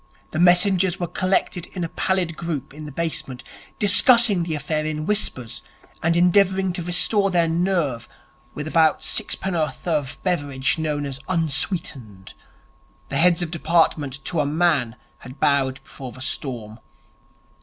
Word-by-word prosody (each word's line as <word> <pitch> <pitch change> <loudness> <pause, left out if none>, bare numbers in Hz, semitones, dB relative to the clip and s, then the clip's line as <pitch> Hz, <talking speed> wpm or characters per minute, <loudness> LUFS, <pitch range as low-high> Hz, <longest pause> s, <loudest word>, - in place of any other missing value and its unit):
The 155 - -3
messengers 180 +1 +4
were 175 - -1
collected 185 0 -1
in 180 - -4
a 165 - -3
pallid 185 -3 -1
group 155 -5 -5
in 155 +1 -9
the 150 - -8
basement, 155 -5 -3 0.3
discussing 215 -1 +6
the 165 -2 -2
affair 155 +1 -2
in 155 0 -3
whispers 145 - -2 0.4
and 165 +1 +1
endeavouring 190 +1 +3
to 175 - -4
restore 180 +4 +2
their 170 -3 +2
nerve 165 - -1 0.5
with 150 +1 -5
about 160 0 +2
sixpenn'orth 180 -7 -1
of 150 -5 -1
the - - -20
beverage 145 -6 0
known 150 -2 -2
as 135 -1 -5
'unsweetened'. 140 - -3 0.8
The 140 - -2
heads 175 +2 +3
of 165 - -5
departments, 160 -5 +1
to 155 +5 -3
a 150 - +1
man, 150 -7 +1 0.2
had 130 +2 -12
bowed 135 -2 +1
before 130 -2 -10
the 130 - -13
storm. 120 -5 -3
160 Hz, 145 wpm, -22 LUFS, 140-180 Hz, 0.8 s, discussing